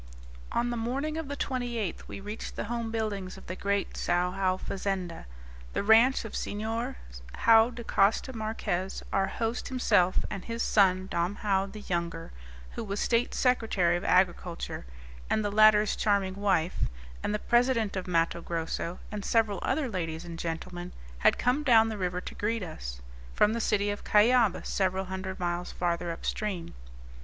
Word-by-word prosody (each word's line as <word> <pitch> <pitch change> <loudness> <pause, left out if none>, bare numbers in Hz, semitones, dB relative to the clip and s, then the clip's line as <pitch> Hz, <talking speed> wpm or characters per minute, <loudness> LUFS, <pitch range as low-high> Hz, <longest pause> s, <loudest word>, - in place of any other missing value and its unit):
On 240 0 0
the 240 - -2
morning 270 +7 -2
of 320 -2 -4
the 285 0 -5
28th 240 -9 -3
we - - -7
reached 210 +3 -6
the - - -3
home 235 +1 -3
buildings 210 -4 -3
of - - -13
the 185 - -5
great 200 +1 -1
Sao 180 +1 +1
Joao 185 -1 0
fazenda, 190 - -4 0.5
the - - -1
ranch 225 +5 +5
of 220 - -7
Senhor 225 +5 -3 0.5
Joao 225 0 +7
da 240 -1 -8
Costa 225 +5 +2
Marques. 215 -4 -2
Our 195 0 +2
host 230 +1 -2
himself, 205 -8 +2
and 195 -3 -5
his 230 0 -2
son, 190 -2 +3
Dom 180 +2 -1
Joao 195 -2 +2
the 210 +2 -9
younger, 170 -3 -3 0.4
who - - -5
was 200 -1 -3
state 235 +1 +1
secretary 220 -9 +2
of 175 - -3
agriculture, 175 - 0 0.4
and 215 - +1
the 205 - 0
latter's 215 0 +5
charming 200 -3 +1
wife, 190 -4 0 0.4
and - - -1
the 210 - +1
president 240 -2 +2
of 190 -1 -3
Matto 170 -1 +1
Grosso, 170 +1 -3
and 210 -1 -4
several 220 -3 +2
other 305 -4 0
ladies 170 -5 -4
and 170 -1 -7
gentlemen, 175 +2 -5 0.3
had - - +4
come 250 +5 +1
down 225 -6 +5
the 220 - -4
river 180 -1 -1
to - - -7
greet 220 0 -1
us, - - -7 0.3
from 210 - +4
the 230 - -1
city 205 -1 +1
of 205 - -6
Cuyaba, 225 0 +4
several 190 0 0
hundred 190 0 -5
miles 175 0 -2
farther 175 0 -1
up 165 - -6
stream. 195 -6 -3
200 Hz, 170 wpm, -29 LUFS, 180-225 Hz, 0.5 s, Joao